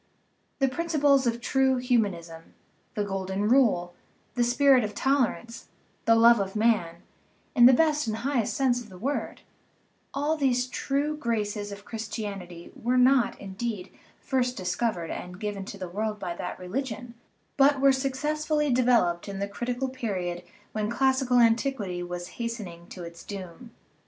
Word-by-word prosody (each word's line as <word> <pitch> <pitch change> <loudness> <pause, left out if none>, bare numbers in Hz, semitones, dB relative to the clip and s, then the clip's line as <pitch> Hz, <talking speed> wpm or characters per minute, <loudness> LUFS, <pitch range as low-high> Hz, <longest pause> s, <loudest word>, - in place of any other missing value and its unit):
The 270 - +2
principles 285 -2 +2
of 235 0 0
true 265 +1 +2
humanism, 195 -10 -1 0.4
the 210 - 0
golden 195 0 -2
rule, 215 -9 +3 0.4
the 240 +1 +1
spirit 255 +1 +4
of 210 -1 -4
tolerance, 245 -4 0 0.4
the 230 - +5
love 235 0 +6
of 195 0 -3
man, 210 -7 +1 0.5
in 240 -3 +8
the 260 - +7
best 300 -1 +2
and 215 - -1
highest 245 -2 -1
sense 250 -3 +2
of 225 - -12
the 185 - -12
word 275 +9 -3 0.7
all 290 +3 0
these 255 -4 +1
true 280 +4 -1
graces 210 -6 -2
of 200 0 -9
Christianity 205 -6 -6
were 245 +2 0
not, 255 0 +4
indeed, 195 0 -5 0.3
first 250 -2 -1
discovered 180 -1 -2
and 180 0 -7
given 205 -2 -4
to 200 - -8
the 185 -2 -5
world 210 +4 -3
by 185 -4 -4
that 180 - -5
religion, 235 +5 -5 0.4
but 280 0 +4
were 275 0 +6
successfully 300 +2 0
developed 230 -8 +2
in 195 - -5
the 200 +1 -2
critical 245 +5 -3
period 190 -9 -3 0.3
when 215 -1 -2
classical 260 0 +2
antiquity 230 -6 +2
was 175 0 -5
hastening 200 -8 -5
to 180 - -9
its 170 0 -10
doom. 200 +4 -8
230 Hz, 150 wpm, -27 LUFS, 195-265 Hz, 0.7 s, in